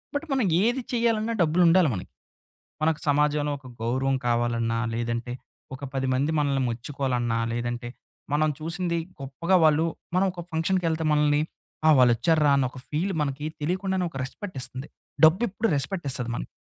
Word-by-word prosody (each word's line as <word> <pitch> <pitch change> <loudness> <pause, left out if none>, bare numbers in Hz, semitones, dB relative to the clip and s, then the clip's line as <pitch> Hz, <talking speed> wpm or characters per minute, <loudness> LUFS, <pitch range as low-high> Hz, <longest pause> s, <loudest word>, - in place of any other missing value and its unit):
But, 290 +3 -1
మనం 260 -4 +2 0.2
ఏది 245 +4 +1
చేయాలన్నా 230 -1 +1
డబ్బులుండాలి 170 0 +4
మనకి. 95 0 -7 0.7
మనకు 160 -1 +2
సమాజంలో 150 0 +2
ఒక 135 -2 -14
గౌరవం 130 +3 0
కావాలన్నా, 120 -1 +1 0.2
లేదంటే 120 +1 -2 0.4
ఒక 130 +2 -8
10 135 -1 -1
మంది 140 +5 +1
మనల్ని 140 -2 +1
మెచ్చుకోవాలన్నా, 120 -1 -2
లేదంటే 120 0 -3 0.4
మనం 155 +1 +3
చూసింది 170 +2 -2 0.2
గొప్పగా 140 +7 0
వాళ్ళు, 155 +1 +4 0.3
మనం 185 +1 +3
ఒక 175 - -6
ఫంక్షన్‌కెళ్తే 165 -1 0
మనల్ని, 150 0 +3 0.5
ఆ! - - +7
వాళ్ళొచ్చార్రా 145 +5 +4
అని 135 - +2
ఒక 130 - -11
ఫీల్ 175 +6 -1
మనకి 145 +1 -2 0.2
తెలియకుండానే 185 +3 -1
ఒక 135 - -8
రెస్పెక్ట్ 180 +5 -7
ఇస్తుంది. 130 +3 -5 0.4
డబ్బెప్పుడు, 195 +6 +2
రెస్పెక్టిస్తది 140 -6 -3
మనకి. - - -5
150 Hz, 140 wpm, -26 LUFS, 130-175 Hz, 0.7 s, ఆ